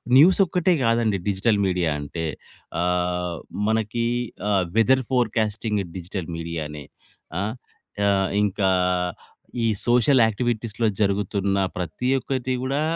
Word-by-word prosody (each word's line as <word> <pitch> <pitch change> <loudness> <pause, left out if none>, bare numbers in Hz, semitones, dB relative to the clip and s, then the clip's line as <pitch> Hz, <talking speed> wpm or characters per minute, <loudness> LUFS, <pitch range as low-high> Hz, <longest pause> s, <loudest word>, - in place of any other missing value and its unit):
News 165 +9 +7
ఒక్కటే 180 +1 +2
గాదండి 115 -3 +2
digital 100 +2 +1
media 90 -3 +1
అంటే. 80 +3 -4 0.6
ఆహ్, 90 -1 0 0.3
మనకి 110 +1 0 0.4
ఆహ్, 95 -3 +2
వెదర్ 130 +3 +4
ఫోర్‌కాస్టింగ్ 110 -3 0
డిజిటల్ 90 0 -5
మీడియా‌నే 75 -3 -5 0.6
ఆ! - - 0 0.6
ఆహ్, 95 -1 +2
ఇంకా 100 -1 +1 0.9
ఈ - - +2 0.2
సోషల్ 125 +2 +4
యాక్టివిటీస్‌లో 110 0 -1
జరుగుతున్న 100 -1 +1 0.2
ప్రతి 90 +9 -2
ఒక్కటి 130 -1 -2
కూడా 135 +3 0
105 Hz, 105 wpm, -24 LUFS, 90-120 Hz, 0.9 s, News